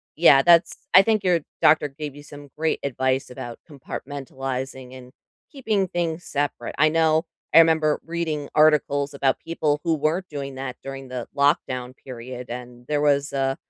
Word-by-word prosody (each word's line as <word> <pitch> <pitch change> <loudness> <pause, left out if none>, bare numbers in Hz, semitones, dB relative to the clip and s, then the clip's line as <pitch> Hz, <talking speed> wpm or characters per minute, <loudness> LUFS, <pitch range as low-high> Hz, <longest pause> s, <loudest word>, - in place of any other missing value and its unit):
yeah, 145 -4 +6
that's 170 +2 +3
I 185 - +10
think 215 -1 +1
your 180 -3 +2 0.2
doctor 155 -1 +5
gave 145 0 -7
you 145 - -12
some 145 -1 -12
great 160 +1 0
advice 130 0 -1
about 120 -2 -8
compartmentalizing 135 -2 -6
and, 125 0 -13 0.4
keeping 220 -9 -1
things 170 -1 -3
separate. 140 -4 -3
I 155 +1 +5
know 160 0 +2 0.3
I - - +9
remember 160 -2 +4
reading 160 -4 -3
articles 150 -2 +3
about 135 -1 +1
people 155 -3 -1
who 165 - +1
weren't 160 +5 -1
doing 140 -3 -6
that 130 -1 -6
during 135 -1 -8
the 125 -2 -5
lockdown 130 -3 +1
period, 125 -1 -9
and 120 0 -9
there 150 -1 0
was 145 -1 +2
a 135 -1 0
145 Hz, 160 wpm, -23 LUFS, 130-160 Hz, 0.4 s, I